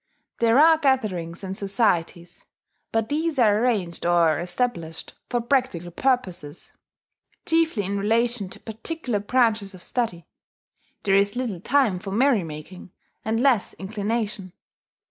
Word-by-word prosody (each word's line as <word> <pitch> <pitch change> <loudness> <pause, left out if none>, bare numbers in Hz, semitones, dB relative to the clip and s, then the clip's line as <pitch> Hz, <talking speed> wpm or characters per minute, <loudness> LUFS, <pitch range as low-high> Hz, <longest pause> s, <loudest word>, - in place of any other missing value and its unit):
There 230 +1 +4
are 320 +2 +6
gatherings 205 - 0
and 190 0 -4
societies; 190 -4 -1 0.4
but 225 -1 0
these 310 +1 -1
are 215 -4 +4
arranged 205 -8 0
or 170 -3 +3
established 175 -3 -3 0.2
for 240 - 0
practical 235 -9 0
purposes 185 - -2 0.7
chiefly 325 -9 +2
in 200 +1 -2
relation 225 0 +1
to - - -11
particular 225 +1 -4
branches 215 -3 +1
of 180 - -11
study; 200 - -2 0.8
there 195 - +2
is 200 +2 +3
little 240 -8 -3
time 245 -6 +2
for 195 - -7
merry 230 0 +3
making, 160 +4 -9 0.3
and 220 +1 0
less 250 -5 +2
inclination. 205 -1 -3
210 Hz, 125 wpm, -24 LUFS, 180-245 Hz, 0.8 s, are